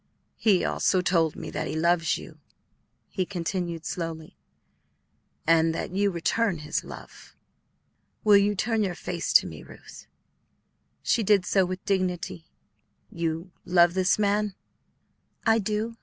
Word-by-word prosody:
"He 200 -5 +3
also 185 - +1
told 170 -3 +1
me - - -7
that 155 - -3
he - - -4
loves 170 +1 +2
you," - - -12 0.7
he 190 - -2
continued 175 -2 -4
slowly, 165 -2 -5 1.1
"and 165 0 +3
that - - -4
you 200 +2 +1
return 185 +3 0
his 150 0 -3
love. - - -12 0.9
Will 210 -1 +6
you 205 +1 +2
turn 225 +2 0
your 190 -4 -1
face 175 -1 -4
to - - +7
me, - - -8
Ruth?" - - -14 1.0
She 235 - +2
did 200 -3 +3
so 190 -1 +2
with 185 0 -6
dignity. 180 -3 -2 0.6
"You 170 -1 -3
love 175 -1 +4
this 185 0 +2
man?" 205 -1 +1 0.9
"I 225 0 +4
do." 215 +3 -2
185 Hz, 135 wpm, -26 LUFS, 170-205 Hz, 1.1 s, to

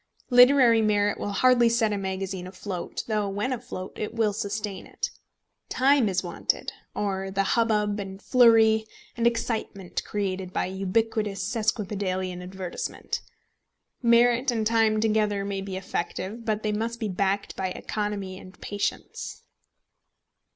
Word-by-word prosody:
Literary 245 -2 +7
merit 205 -1 +2
will 205 - -3
hardly 240 +3 +5
set 225 -2 +2
a - - -1
magazine 190 -1 -4
afloat, 185 -1 -5
though 210 -3 0
when 205 +7 -1
afloat 185 -6 -7
it 215 +2 -4
will 220 -3 +2
sustain 205 -1 -4
it. - - -4 0.6
Time 265 -3 +4
is 185 -1 0
wanted, 175 -1 -2 0.2
or 195 -2 -2
the 195 +1 +1
hubbub, 210 -3 +2
and 195 -1 -6
flurry, 225 -2 +5 0.3
and 235 0 +2
excitement 225 -5 -2
created 190 -3 -3
by - - 0
ubiquitous 200 +1 -1
sesquipedalian 195 -4 -1
advertisement. 185 0 -5 0.8
Merit 240 +2 +4
and 225 -3 0
time 220 -1 +3
together 210 -2 +1
may 200 -1 -3
be 195 -1 -5
effective, 190 +4 -4
but 215 -1 -1
they 215 - 0
must 230 +2 -2
be 220 - -1
backed 200 +1 -1
by 190 - -1
economy 200 -1 -4
and 185 0 -14
patience. 205 0 -4
210 Hz, 135 wpm, -26 LUFS, 195-225 Hz, 0.8 s, Literary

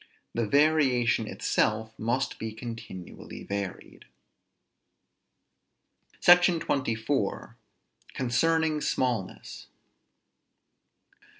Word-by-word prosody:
The 115 -2 -1
variation 130 -5 +3
itself 110 +1 0
must 125 +4 -1
be 110 -1 -4
continually 110 -5 -8
varied. 100 -2 -6 2.1
SECTION 175 -1 +6
XXIV. 130 -7 -1 0.6
CONCERNING 155 +5 +1
SMALLNESS. 120 -10 -2
120 Hz, 60 wpm, -28 LUFS, 110-150 Hz, 2.1 s, SECTION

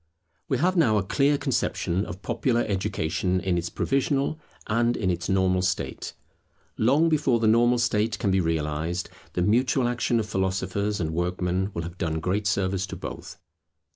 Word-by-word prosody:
We 130 - +2
have 180 +8 +2
now 120 -12 +4
a 100 - +1
clear 140 +8 +2
conception 95 -7 -1
of 95 - -8
popular 120 0 0
education 95 -2 -1
in 95 -1 0
its 85 0 -2
provisional, 140 +2 0 0.3
and 120 +2 +1
in 95 -4 0
its 90 0 -3
normal 95 -1 +2
state. 95 +1 -3 0.6
Long 140 +9 +3
before 145 -7 +2
the 115 - 0
normal 120 +3 +4
state 115 -1 +1
can 100 -5 0
be 95 - +3
realized, 80 +2 -2 0.2
the 90 - 0
mutual 120 +5 +2
action 120 -1 0
of 110 - -1
philosophers 95 +1 -1
and 80 -3 -1
workmen 90 +2 -1
will 85 - -2
have 85 +1 -8
done 80 -1 -1
great 95 +5 -1
service 95 -1 0
to - - -6
both. - - -8
100 Hz, 170 wpm, -26 LUFS, 90-120 Hz, 0.6 s, now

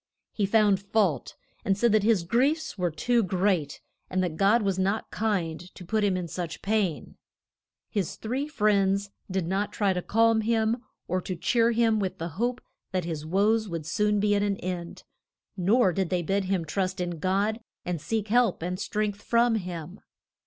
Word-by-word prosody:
He 205 -3 0
found 205 -2 +4
fault, 200 -4 0 0.3
and 195 -1 +1
said 235 +2 +3
that 215 0 +4
his 210 -4 +3
griefs 275 - +1
were 180 -3 0
too 230 +10 +1
great, 185 -6 0 0.3
and 185 0 0
that 170 -3 -2
God 205 +6 +3
was 195 -2 0
not 195 +4 -1
kind 190 -8 -1 0.2
to 180 - -10
put 215 +4 0
him 195 -3 +2
in 180 -1 -3
such 170 -1 -5
pain. 200 -6 -1 0.7
His 200 -6 -2
three 255 +6 -3
friends 200 -6 +1 0.2
did 190 -2 -1
not 195 +4 -1
try 200 -3 +1
to 180 - -2
calm 225 +3 +3
him, 225 +1 +1 0.3
or 185 +1 0
to 185 - -4
cheer 230 +7 +2
him 225 -2 +2
with 190 -2 -2
the 165 +1 -4
hope 240 +9 -2 0.3
that 185 -3 -1
his 155 -2 -4
woes 210 +4 +2
would 165 -3 -4
soon 210 +5 +1
be 205 0 +2
at 200 - +2
an 200 -1 0
end, 175 -2 -5 0.5
nor 195 +1 +3
did 190 -2 -1
they 180 -2 0
bid 195 +3 0
him 185 -3 0
trust 185 +4 -2
in 175 -2 -3
God 200 +6 0 0.3
and 175 -3 -3
seek 220 +2 -2
help 235 -7 +2
and 180 +1 -3
strength 205 0 -2
from 235 +1 +3
him. 180 -3 -5
200 Hz, 185 wpm, -27 LUFS, 180-220 Hz, 0.7 s, found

